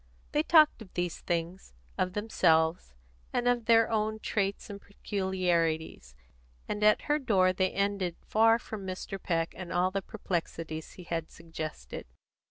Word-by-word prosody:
They 295 - +2
talked 310 -5 +5
of 195 -4 -11
these 175 -2 -2
things, 170 - -3 0.2
of 185 0 -1
themselves, 165 - +2 0.4
and 245 0 0
of 245 -2 +2
their 230 0 +5
own 215 0 0
traits 200 -2 -2
and 200 -2 -8
peculiarities; 175 - -1 0.5
and 210 - -2
at 215 0 +5
her 295 +1 +1
door 190 -8 +3
they 185 0 +1
ended 200 -3 -1
far 225 +1 +4
from 220 -3 -7
Mr. 190 +1 -5
Peck 165 -2 -1
and 180 -1 -7
all 180 +1 +2
the 195 +1 -1
perplexities 165 -6 -4
he 180 - -11
had 165 -2 -3
suggested. 155 - -7
185 Hz, 150 wpm, -30 LUFS, 170-215 Hz, 0.5 s, talked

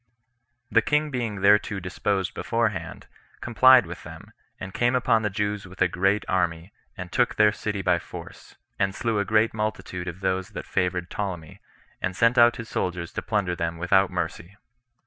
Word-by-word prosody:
The - - +5
king 150 0 0
being 115 -6 -3
thereto 100 0 +3
disposed 95 0 -2
beforehand, - - -2 0.3
complied 125 0 +6
with 85 0 -8
them, - - -12 0.3
and 95 0 -7
came 120 +1 +1
upon 115 -3 +2
the 105 - 0
Jews 105 0 -3
with 95 +1 -14
a - - +4
great 95 +4 +1
army, 85 0 -1 0.2
and - - -7
took - - +1
their 105 0 +5
city 105 -2 -4
by 90 -1 +2
force, - - -11 0.2
and 95 -1 0
slew 115 -3 -1
a 100 - 0
great 110 +3 +2
multitude 95 -4 -4
of 90 +2 -6
those 95 0 -1
that - - -5
favored 90 -2 -1
Ptolemy, 90 -7 -5 0.4
and 90 - -2
sent 115 +4 +3
out 120 0 +6
his 115 -2 -7
soldiers 85 -2 -3
to - - -3
plunder 100 -5 -1
them 85 -1 -3
without 95 +3 +3
mercy. 95 +4 -5
100 Hz, 175 wpm, -25 LUFS, 90-110 Hz, 0.4 s, complied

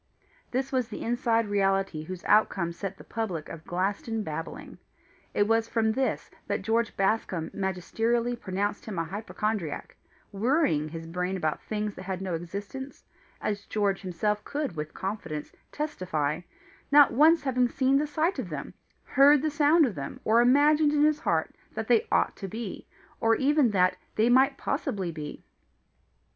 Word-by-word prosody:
This 265 +2 -2
was 255 -3 0
the - - -6
inside 230 -1 +1
reality 195 -4 +1
whose 180 +3 -7
outcome 195 -5 +3
set 195 +3 -6
the - - -12
public 190 -9 -4
of 165 -1 -9
Glaston 205 +5 -1
babbling. 165 -1 -6 0.6
It 205 - +3
was 225 0 +2
from 225 -1 +1
this 260 +3 -1 0.2
that - - -2
George 230 0 0
Bascombe 195 -4 0
magisterially 225 +6 -1
pronounced 205 -1 -3
him 210 -4 -5
a 165 - +1
hypochondriac, 205 -1 -3 0.4
worrying 205 - +1
his 165 +1 -7
brain 180 +3 -2
about 155 -4 -1
things 210 -1 -3
that - - -10
had 190 -1 -4
no 190 -2 -3
existence 200 +11 -6 0.4
as 205 -1 -3
George 200 -2 0
himself 205 +3 -1
could 285 - -3
with 150 0 -5
confidence 175 -7 -4 0.2
testify, 175 - -2 0.5
not 290 0 +7
once 310 +5 +5
having 250 -2 +2
seen 270 +2 +2
the 300 - 0
sight 320 +6 0
of - - -4
them, - - -6 0.3
heard 285 +1 +5
the 310 - +1
sound 300 +2 +5
of 240 - -2
them, 140 -5 -6
or 225 +2 +4
imagined 290 +4 +4
in 295 0 +3
his 300 0 +3
heart - - 0 0.2
that - - -3
they 455 +1 +3
ought - - +2
to 195 - -5
be, 220 0 -6 0.3
or 225 0 +3
even 280 -1 +3
that 185 -2 +2 0.2
they 220 +2 +3
might 265 +2 +4
possibly 200 - -2
be. 150 -2 -7
215 Hz, 160 wpm, -28 LUFS, 185-260 Hz, 0.6 s, not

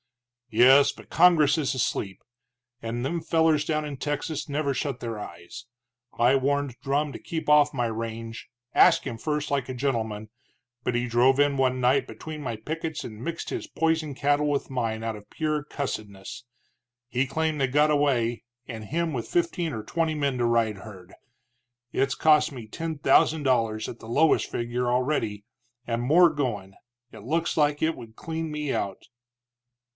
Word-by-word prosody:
"Yes, 130 +5 +6
but - - -15
Congress 165 -4 +5
is 140 -2 0
asleep, 100 -5 -2 0.6
and 120 +2 -3
them 165 +4 -2
fellers 160 -2 +2
down 155 -1 -1
in 145 -1 -5
Texas 145 +2 -3
never 140 -1 0
shut 135 -1 -3
their 115 -2 -4
eyes. 85 -1 -9 0.5
I 120 +3 +4
warned 140 -1 0
Drumm 140 +2 0
to - - -7
keep 160 -1 -5
off 150 0 +5
my 125 -3 0
range, 115 0 -5 0.2
asked - - +5
him 115 - -4
first 150 +4 -2
like 140 -2 -1
a - - -3
gentleman, 110 -5 -2 0.5
but 125 - -1
he 120 +1 0
drove 125 +3 +3
in 145 -1 +3
one 130 -1 +1
night 125 +2 +3
between 155 -1 -8
my 120 -5 -4
pickets 160 +6 -4
and 110 0 -8
mixed 170 +2 -4
his - - -4
poison 160 -2 0
cattle 145 +2 +1
with 140 -1 -1
mine 115 -3 -2
out 115 -1 -2
of 105 -1 -13
pure 155 -2 -1
cussidness. 110 -8 -6 0.6
He 125 +2 0
claimed 155 +1 -1
they 135 - +3
got 150 +4 +3
away, 130 -6 +1 0.2
and 110 -3 -7
him 165 +6 -1
with 120 -3 -4
fifteen 330 - 0
or 110 -5 -5
twenty 160 +5 -1
men 140 -3 0
to 120 - +2
ride 115 -3 +1
herd! 95 -3 -12 0.8
It's 135 0 +1
cost 150 0 +4
me 120 -5 -9
ten 160 +6 -5
thousand 145 +2 +3
dollars, 115 -5 +1
at 120 - -8
the 110 - -11
lowest 155 +6 +3
figure, 120 +1 -2
already, 125 -5 -1 0.4
and 115 0 -1
more 165 +8 +6
goin'. 120 -11 -3 0.4
It 110 -2 -11
looks 165 +7 -1
like 150 -1 +2
it 160 +1 +1
would 110 -1 -12
clean 160 -1 -4
me 150 -2 -2
out." 100 -1 -3
135 Hz, 170 wpm, -26 LUFS, 115-150 Hz, 0.8 s, Yes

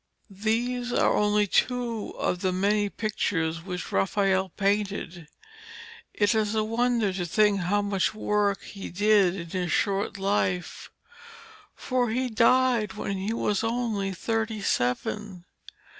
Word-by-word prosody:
These 245 +2 0
are - - +2
only 210 0 +3
two 235 +1 0
of 180 - -1
the 185 - +1
many 205 +2 +1
pictures 165 -7 -2
which 180 0 -6
Raphael 195 -1 +1
painted. 195 -3 -2 0.8
It 205 +1 +2
is 215 -1 0
wonderful 220 -3 0
to 170 - -6
think 210 -2 +3
how 200 +3 0
much 200 +1 0
work 210 -2 0
he 195 -1 -8
did 200 -1 +3
in 170 -3 -7
his 180 -3 -2
short 200 -1 0
life, 190 -2 -1 0.9
for 250 -2 -1
he 250 +3 -1
died 235 -2 +3
when 200 -1 -3
he 195 +3 -2
was 210 -2 0
only 225 -4 -1
thirty 225 +3 -2
seven. 180 +10 -2
205 Hz, 130 wpm, -26 LUFS, 190-220 Hz, 0.9 s, only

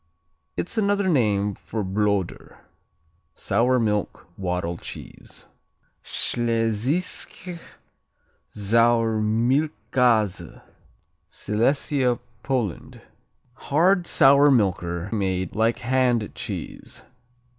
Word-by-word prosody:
It's 220 +6 -2
another 200 -1 +1
name 105 - +2
for 110 +2 -5
Bloder, 100 -1 -2 0.8
sour 125 +2 +1
milk 105 -6 -1
"waddle" 90 -2 -3
cheese. - - -10 0.6
Schlesische 120 - -1 0.9
Sauermilchkäse 115 - +1 0.7
Silesia, 125 +3 0 0.2
Poland 120 - -3 0.5
Hard; 175 +7 +2
sour 140 +2 +6
milker; 90 -7 +1
made 95 -4 -1
like 115 +2 +2
hand 125 -3 +1
cheese. - - -7
115 Hz, 70 wpm, -24 LUFS, 105-135 Hz, 0.9 s, sour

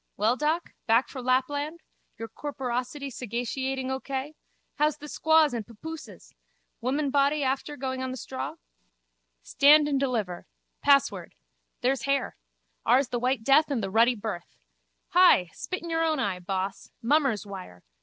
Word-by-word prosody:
Well, 220 +4 +2
doc? 310 +5 -1 0.2
Back 230 +3 +3
fro 260 - -7
Lapland? 285 +5 0 0.4
Your 225 - -5
corporosity 265 +2 -4
sagaciating 260 +3 -3
O 265 - -1
K? 275 +2 -4 0.4
How's 300 0 +2
the 295 - -10
squaws 315 -2 +3
and 230 -2 -2
papooses? 310 +9 -10 0.5
Womanbody 280 +3 +1
after 275 +2 -2
going 260 0 -3
on 260 - -2
the 255 - -5
straw? 260 +2 -5 0.9
Stand 295 - +6
and 280 -2 +1
deliver. 220 -10 -2 0.3
Password. 275 - +2 0.5
There's 260 0 +1
hair. 275 -1 0 0.5
Ours 265 -1 +3
the 240 - -1
white 250 -1 0
death 280 +5 +5
and 255 -7 -1
the 195 - -3
ruddy 230 +4 +4
birth. 205 -5 -6 0.5
Hi! 350 - +5
Spit 370 -2 -5
in 340 - -5
your 325 0 +1
own 315 -1 +1
eye, 195 -7 -1
boss! 190 +1 -4
Mummer's 265 -5 +2
wire. 185 - -9
265 Hz, 145 wpm, -27 LUFS, 230-290 Hz, 0.9 s, Stand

